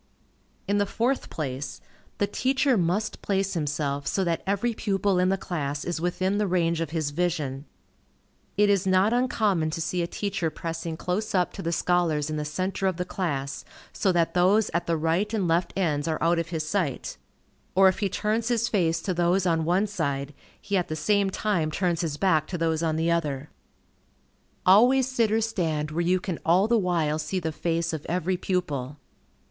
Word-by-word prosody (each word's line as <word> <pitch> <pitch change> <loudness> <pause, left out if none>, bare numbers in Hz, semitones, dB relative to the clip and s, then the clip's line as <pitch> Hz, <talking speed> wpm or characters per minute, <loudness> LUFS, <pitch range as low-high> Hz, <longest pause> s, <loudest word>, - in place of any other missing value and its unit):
In 205 0 +2
the 200 - +1
fourth 245 +6 -1
place, 135 -3 -4 0.4
the 205 - +2
teacher 265 +5 +1
must 190 +3 0
place 195 -1 0
himself 145 -3 -2
so 195 - +1
that 170 -2 0
every 205 +4 +1
pupil 195 -3 0
in 180 0 +3
the 195 - +1
class 145 -6 -3
is 175 -2 -3
within 185 +3 0
the 210 - +1
range 170 -2 +1
of 165 - -2
his 155 -2 -2
vision. 150 -4 -2 0.9
It 210 0 +5
is 200 -2 +2
not 190 +4 +4
uncommon 215 -9 +1
to 155 - -4
see 175 +2 -1
a 170 - -1
teacher 200 -3 -2
pressing 165 0 -5
close 200 +5 -2
up 180 -1 +1
to - - -6
the 170 - -2
scholars 165 -4 +1
in 155 - -2
the 150 - -2
centre 185 +5 -2
of 185 -3 -1
the 180 - -2
class, 140 -8 -3 0.3
so 195 - +1
that 170 -2 +1
those 190 +5 +3
at 170 - -1
the 165 -1 +1
right 165 +7 0
and 195 -5 0
left 170 +1 +1
ends 155 -5 0
are 160 -1 0
out 170 +1 +2
of 170 0 -3
his 160 -3 -3
sight; 155 -6 -2 0.6
or 190 0 +7
if 190 - +2
he 200 - 0
turns 220 +4 -1
his 230 -2 +1
face 165 -6 +1
to 185 - -1
those 175 +2 +2
on 165 -2 +1
one 180 +5 +2
side, 140 -8 -3 0.3
he 200 - -1
at 180 - 0
the 155 - -3
same 200 +5 +2
time 190 -5 0
turns 175 +1 0
his 155 -4 -2
back 160 -5 +2
to 180 - -4
those 165 -1 0
on 160 -2 0
the 165 +1 +1
other. 150 -4 -1 1.1
Always 245 +7 +6
sit 235 -4 +1
or 220 +1 +2
stand 160 -9 -1
where 165 +3 -1
you 180 +2 +2
can 180 -2 -4
all 180 +5 +4
the 235 - +3
while 165 -5 0
see 155 +5 -2
the 160 -2 -2
face 165 +1 -1
of 155 -2 -4
every 180 +2 0
pupil. 150 -7 -2
175 Hz, 195 wpm, -26 LUFS, 160-195 Hz, 1.1 s, or